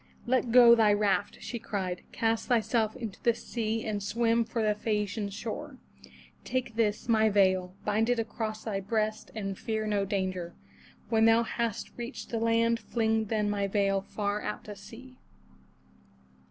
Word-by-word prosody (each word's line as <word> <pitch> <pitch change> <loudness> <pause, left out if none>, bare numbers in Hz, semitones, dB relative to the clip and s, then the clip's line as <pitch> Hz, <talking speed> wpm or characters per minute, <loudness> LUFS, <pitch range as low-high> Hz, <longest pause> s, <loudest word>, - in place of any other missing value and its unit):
"Let 250 -1 +1
go 240 -1 +9
thy 220 -3 +5
raft," 205 -1 +1
she 235 - -5
cried. 190 -5 -3
"Cast 225 0 0
thyself 225 -2 +1
into 230 -6 -7
the 235 -1 +3
sea 225 -1 -3
and 210 -2 -2
swim 230 +3 +1
for 225 0 -2
the 210 -1 +3
Phae 210 0 0
a'ci 205 -1 -6
an 200 - -2
shore. 260 +8 -6 0.7
Take 255 -3 -2
this, 215 -2 0
my 220 -2 +4
veil; 185 -2 +2
bind 220 +3 +1
it 245 - +2
across 220 -1 -3
thy 205 -3 -2
breast 215 +2 -2
and 195 -3 -4
fear 220 -2 -2
no 205 -2 +1
danger. 185 -3 -2 0.5
When 225 -1 +4
thou 225 +1 +5
hast 230 -2 -3
reached 240 +3 -6
the 230 - -1
land, 230 0 +2
fling 220 -2 0
then 210 0 0
my 200 -1 0
veil 195 -1 +1
far 205 +1 -3
out 210 - -4
to 210 - -8
sea." 230 +6 -13
220 Hz, 165 wpm, -29 LUFS, 205-230 Hz, 0.7 s, go